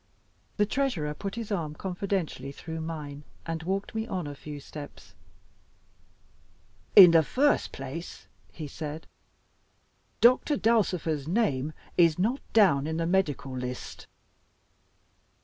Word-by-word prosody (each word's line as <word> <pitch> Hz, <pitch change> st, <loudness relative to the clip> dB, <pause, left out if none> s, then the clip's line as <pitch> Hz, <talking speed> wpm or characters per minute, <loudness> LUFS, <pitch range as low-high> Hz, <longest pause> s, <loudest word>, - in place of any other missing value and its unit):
The 210 Hz, -, +4 dB
Treasurer 210 Hz, -, -1 dB
put 195 Hz, +6 st, -5 dB
his 230 Hz, -2 st, -5 dB
arm 160 Hz, -6 st, -2 dB
confidentially 180 Hz, -7 st, -3 dB
through 160 Hz, +3 st, -7 dB
mine, 150 Hz, -3 st, -6 dB, 0.2 s
and 165 Hz, -1 st, -3 dB
walked 195 Hz, +4 st, -3 dB
me 220 Hz, 0 st, -2 dB
on 185 Hz, -6 st, -3 dB
a 145 Hz, -, -5 dB
few 145 Hz, +1 st, -8 dB
steps. 145 Hz, +1 st, -10 dB, 1.8 s
"In 185 Hz, -4 st, +11 dB
the 165 Hz, -1 st, +6 dB
first 280 Hz, -, +1 dB
place," 135 Hz, +6 st, -7 dB, 0.3 s
he 155 Hz, -3 st, -7 dB
said, 155 Hz, +2 st, -6 dB, 1.1 s
"Doctor 255 Hz, +4 st, +4 dB
Dulcifer's 180 Hz, -, +1 dB
name 155 Hz, -, 0 dB, 0.2 s
is 165 Hz, -3 st, +5 dB
not 230 Hz, +9 st, +1 dB
down 160 Hz, -10 st, +4 dB
in 160 Hz, 0 st, -2 dB
the 165 Hz, -, 0 dB
Medical 150 Hz, -8 st, 0 dB
List." 125 Hz, 0 st, -6 dB
165 Hz, 120 wpm, -28 LUFS, 150-200 Hz, 1.8 s, In